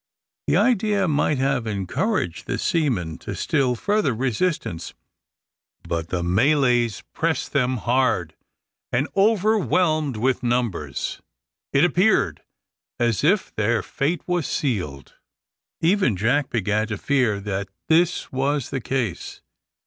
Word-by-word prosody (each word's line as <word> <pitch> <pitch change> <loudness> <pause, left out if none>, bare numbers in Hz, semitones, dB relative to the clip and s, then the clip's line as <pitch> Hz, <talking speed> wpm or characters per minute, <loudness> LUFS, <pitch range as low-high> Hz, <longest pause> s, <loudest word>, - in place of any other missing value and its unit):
The - - +3
idea 210 -5 +2
might 150 -1 +1
have 130 -3 0
encouraged 100 - -2
the - - -1
seamen 120 - 0
to - - -6
still 125 -3 +1
further 205 - 0
resistance, 125 - -2 0.9
but 85 -1 -2
the 90 -1 -1
Malays 120 - +2
pressed 165 0 -1
them 130 -2 +1
hard; 120 -9 +1 0.6
and, 135 +5 +1
overwhelmed 185 - +2
with 130 +4 +1
numbers, 115 - -2 0.5
it 135 +5 +4
appeared 175 - +2 0.6
as 120 -2 +1
if 185 +6 +2
their 110 +2 +1
fate 150 +5 -2
was 175 -4 -1
sealed. 90 - -3 0.7
Even 170 - +2
Jack 125 +8 +1
began 110 -1 0
to 105 -2 -4
fear 125 -5 +1
that 100 -1 -4 0.2
this 170 +2 +2
was 135 0 -1
the 135 - -2
case. 120 -5 -3
130 Hz, 120 wpm, -23 LUFS, 105-160 Hz, 0.9 s, it